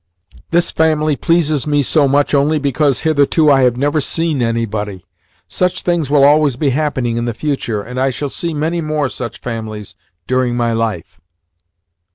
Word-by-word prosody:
This 170 +1 +2
family 155 -2 +1
pleases 155 -3 +1
me 145 -1 +2
so 145 +1 +2
much 145 +2 +1
only 145 +2 +2
because 140 -1 0
hitherto 155 0 +3
I 135 -1 +4
have 125 -2 +2
never 145 +3 +1
seen 160 -1 -1
anybody. 110 -5 -2 0.4
Such 180 0 -1
things 170 -5 0
will 145 -1 +4
always 145 -2 +4
be 140 +1 0
happening 130 -5 -1
in 120 - -1
the 120 -2 -3
future, 120 -7 -2
and 125 +3 -6
I 135 +1 +2
shall 140 +2 -4
see 170 +4 -3
many 160 +3 -2
more 155 -3 -1
such 120 +2 -6
families 110 -3 -6 0.3
during 125 -1 0
my 120 -1 0
life." 115 -6 -3
140 Hz, 170 wpm, -16 LUFS, 120-155 Hz, 0.4 s, I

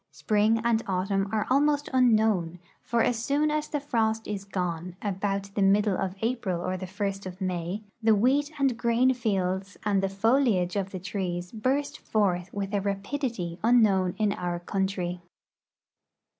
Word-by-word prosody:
Spring 210 +10 +2
and 230 -1 +2
autumn 195 +1 0
are 220 -1 0
almost 290 +2 +3
unknown, 215 -9 +3 0.2
for 235 -1 +1
as 230 -2 0
soon 295 +4 +1
as 305 0 -1
the 295 - -2
frost 225 -5 0
is 200 -2 -4
gone, 180 -2 -3
about 200 0 -2
the 200 - -1
middle 200 +1 +3
of 190 0 -2
April 225 -7 -1
or 185 +1 -2
the 185 0 -5
first 195 0 -3
of 185 0 -9
May, 185 +2 -3 0.2
the 220 -1 +5
wheat 275 +8 +2
and 270 -3 +2
grain 240 +3 +3
fields 195 -4 -2
and 200 -2 +2
the 195 - 0
foliage 205 -3 +2
of 195 -1 -1
the 190 - -6
trees 180 -2 -4
burst 260 +6 -1
forth 185 -4 0
with 200 0 -4
a 200 - +1
rapidit}' 200 -2 -3
unknown 205 -6 +4
in 210 -2 +1
our 175 -1 -3
country. 180 -1 -2
200 Hz, 160 wpm, -27 LUFS, 185-230 Hz, 0.2 s, the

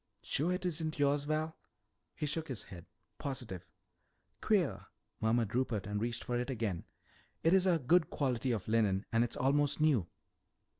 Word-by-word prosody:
"Sure 160 +6 +1
it 180 0 -2
isn't 160 -2 -1
yours, 145 0 +2
Val?" 155 +1 -1 0.6
He 150 - -2
shook 160 +2 -1
his 130 -5 -4
head. 90 -2 -11 0.3
"Positive." 125 - -4 0.7
"Queer," 140 - +1 0.3
murmured 110 -1 +1
Rupert 120 -4 0
and 105 0 -2
reached 120 0 -2
for 120 0 -1
it 125 - -3
again. 110 -9 -2 0.6
"It's 185 +3 +5
a 175 -2 +4
good 160 +4 +3
quality 130 -2 0
of 105 -6 -2
linen 110 -3 +2
and 115 +1 +4
it's 120 - -2
almost 145 +3 +2
new." 140 - +3
130 Hz, 155 wpm, -34 LUFS, 110-155 Hz, 0.7 s, It's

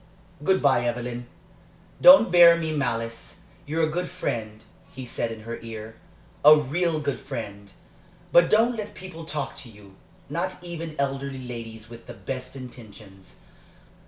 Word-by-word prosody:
"Good 190 +1 +2
bye, 130 -4 +4
Evelyn. 120 0 -3 0.7
Don't 270 -7 +9
bear 170 -1 +8
me 160 -2 -2
malice. 115 -5 -3 0.3
You're 160 +2 0
a - - -4
good 180 +3 -2
friend," 110 -11 -4 0.3
he 130 -1 -8
said 115 -1 -3
in 110 -1 -8
her 115 +1 -6
ear 110 -1 -8 0.5
"a 150 +1 +10
real 155 +3 0
good 145 -2 -2
friend. 100 0 -7 0.6
But 170 -1 +6
don't 230 +3 +3
let 210 -1 -6
people 175 -3 -9
talk 150 -2 -4
to 125 - -7
you 100 -3 -16 0.3
not 185 +3 -3
even 165 -2 -6
elderly 135 -2 -3
ladies 115 -2 -8
with 115 0 -13
the 120 - -9
best 130 +1 -6
intentions. 110 -7 -12
135 Hz, 150 wpm, -25 LUFS, 115-165 Hz, 0.7 s, a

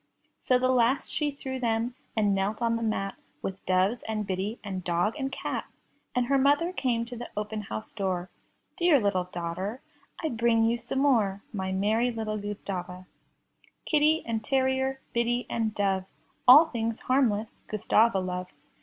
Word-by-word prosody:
So 255 - +3
the 255 +1 +1
last 255 +1 +2
she 300 -1 +1
threw 265 -2 -5
them, 230 0 0 0.2
and 205 -2 +3
knelt 195 +2 0
on 230 -1 +1
the 230 - -2
mat 205 -3 -1 0.3
With 190 0 -5
doves, 190 +6 +2
and 215 -1 -2
biddy, 195 +4 -2
and 190 -3 -4
dog, 175 +5 +1
and 270 -2 -3
cat. - - -3 0.5
And 250 -1 +2
her 275 +2 +2
mother 290 +6 +3
came 235 -7 0
to 245 +1 -8
the 240 +1 -7
open 210 0 -3
house 110 - -7
door; 185 -3 -2 0.5
"Dear 340 -5 +5
little 200 -4 +1
daughter, 180 +6 -4 0.4
I 315 - -1
bring 230 -2 +2
you 230 +1 +2
some 240 +3 -5
more, 220 -8 +2
My 190 -2 -2
merry 215 +6 +2
little 220 -2 -3
Gustava!" 185 -3 -5 0.8
Kitty 310 +1 +3
and 225 -2 -2
terrier, 265 +1 +1
biddy 240 +1 +1
and 225 -2 0
doves. 195 -2 0 0.3
All 290 +6 +10
things 230 -6 -3
harmless 230 -5 +2 0.2
Gustava 215 +1 +3
loves. 180 -1 -4
225 Hz, 165 wpm, -28 LUFS, 195-255 Hz, 0.8 s, All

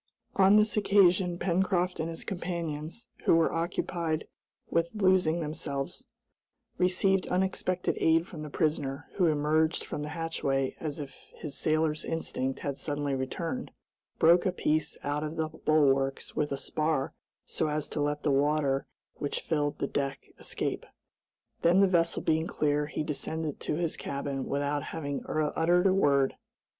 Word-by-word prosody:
On 195 +1 +6
this 215 0 +4
occasion 190 -4 +4
Pencroft 180 0 +1
and 160 +1 -1
his 165 - -5
companions, 170 0 -4 0.2
who - - +6
were 165 -1 +3
occupied 165 -1 -2 0.4
with 170 +4 0
loosing 185 -5 +3
themselves, 150 -3 -4 0.7
received 185 +1 +2
unexpected 185 0 0
aid 165 +1 +4
from 155 - -8
the 155 - -6
prisoner, 145 -3 -1
who 180 -3 +4
emerged 155 +1 +2
from 150 - -4
the 150 - -4
hatchway 145 -4 -1
as 155 -1 -4
if 140 -2 -9
his 145 -3 -5
sailor's 155 0 +1
instinct 135 -5 -2
had 140 -1 -3
suddenly 145 -2 -2
returned, 165 - -3 0.5
broke 170 +2 +6
a 185 - +1
piece 155 -3 0
out 145 +1 -1
of 155 +1 -4
the 160 -1 -1
bulwarks 135 -4 +1
with 150 -1 0
a 140 - -1
spar 155 -1 -1 0.3
so - - -1
as 150 0 -1
to 150 - -2
let 145 0 -1
the 145 - +2
water 140 -1 +2 0.3
which 145 - -2
filled 145 -2 -1
the - - -1
deck 140 -1 -3
escape. - - -3 0.7
Then 175 +3 +5
the 195 - +6
vessel 170 -2 +1
being 160 +1 +1
clear, 150 -2 0
he 155 - -3
descended 155 0 -3
to - - -2
his 165 0 -1
cabin 140 -1 -3
without 145 +1 0
having 145 -3 -4
uttered 160 +4 +2
a 190 - +5
word. 140 -7 +3
155 Hz, 150 wpm, -29 LUFS, 145-175 Hz, 0.7 s, On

